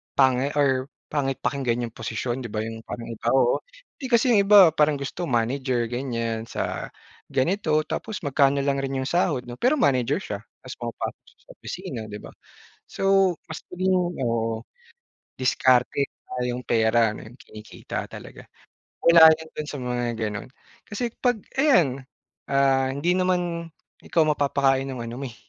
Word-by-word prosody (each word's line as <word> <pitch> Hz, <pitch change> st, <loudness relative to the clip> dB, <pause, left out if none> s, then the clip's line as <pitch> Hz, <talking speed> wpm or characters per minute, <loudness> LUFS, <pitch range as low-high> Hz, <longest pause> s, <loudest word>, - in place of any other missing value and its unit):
pangit 135 Hz, +1 st, +3 dB
or 135 Hz, -2 st, +2 dB, 0.2 s
pangit 135 Hz, -3 st, -1 dB
pakinggan 120 Hz, -4 st, -1 dB
yung 115 Hz, -, -15 dB
posisyon 125 Hz, 0 st, -3 dB
,'di 120 Hz, -, -4 dB
ba, 105 Hz, -, -2 dB
yung 115 Hz, 0 st, -6 dB
parang 120 Hz, -, -6 dB
iba, 115 Hz, +1 st, -6 dB
oo, 125 Hz, -2 st, +3 dB, 0.4 s
'di 265 Hz, -, -4 dB
kasi 235 Hz, +2 st, +4 dB
yung 200 Hz, -3 st, +4 dB
iba 200 Hz, -5 st, +8 dB
parang 150 Hz, -1 st, +2 dB
gusto 140 Hz, +5 st, -5 dB
manager 120 Hz, 0 st, 0 dB
ganyan 115 Hz, -3 st, -2 dB
sa -, -, -3 dB, 0.4 s
ganito 155 Hz, +1 st, +1 dB
tapos 205 Hz, +5 st, -5 dB
magkano 140 Hz, 0 st, +2 dB
lang 140 Hz, 0 st, 0 dB
rin 135 Hz, 0 st, -3 dB
yung -, -, -4 dB
sahod 170 Hz, -7 st, +1 dB
'no 120 Hz, 0 st, -10 dB
pero 255 Hz, +5 st, +3 dB
manager 135 Hz, -, +2 dB
siya, 100 Hz, -, -5 dB, 0.2 s
ta's 130 Hz, -, -9 dB
pumapasok 120 Hz, -1 st, -5 dB
siya -, -, -23 dB
sa -, -, -12 dB
opisina 115 Hz, -, -6 dB
'di 105 Hz, 0 st, -7 dB
ba. -, -, -10 dB, 0.6 s
So 195 Hz, -1 st, +3 dB, 0.2 s
mas 160 Hz, -, -6 dB
naging 185 Hz, +1 st, +1 dB, 0.3 s
oo, 115 Hz, -1 st, -1 dB, 0.8 s
diskarte 130 Hz, +1 st, +2 dB, 0.4 s
yung 125 Hz, +1 st, -4 dB
pera 115 Hz, -1 st, +3 dB
ano -, -, -9 dB
yung 120 Hz, -, -16 dB
kinikita 105 Hz, 0 st, -7 dB
talaga. -, -, -11 dB, 0.6 s
Wala 170 Hz, -1 st, +10 dB
yun 160 Hz, -, -10 dB
do'n 150 Hz, -, -4 dB
sa 145 Hz, -, -6 dB
mga 125 Hz, -1 st, -2 dB
gano'n. 105 Hz, 0 st, -3 dB, 0.4 s
Kasi 230 Hz, +3 st, -3 dB
'pag 245 Hz, -3 st, +1 dB, 0.2 s
ayan 165 Hz, -, +3 dB, 0.5 s
ah, 135 Hz, -1 st, +3 dB
hindi 160 Hz, +7 st, 0 dB
naman 175 Hz, -2 st, -1 dB, 0.3 s
ikaw 165 Hz, -, +2 dB
mapapakain 140 Hz, -2 st, +1 dB
ng 130 Hz, -, -6 dB
ano 115 Hz, +1 st, -6 dB
mo -, -, -3 dB
eh, -, -, -16 dB
135 Hz, 160 wpm, -24 LUFS, 120-160 Hz, 0.8 s, Wala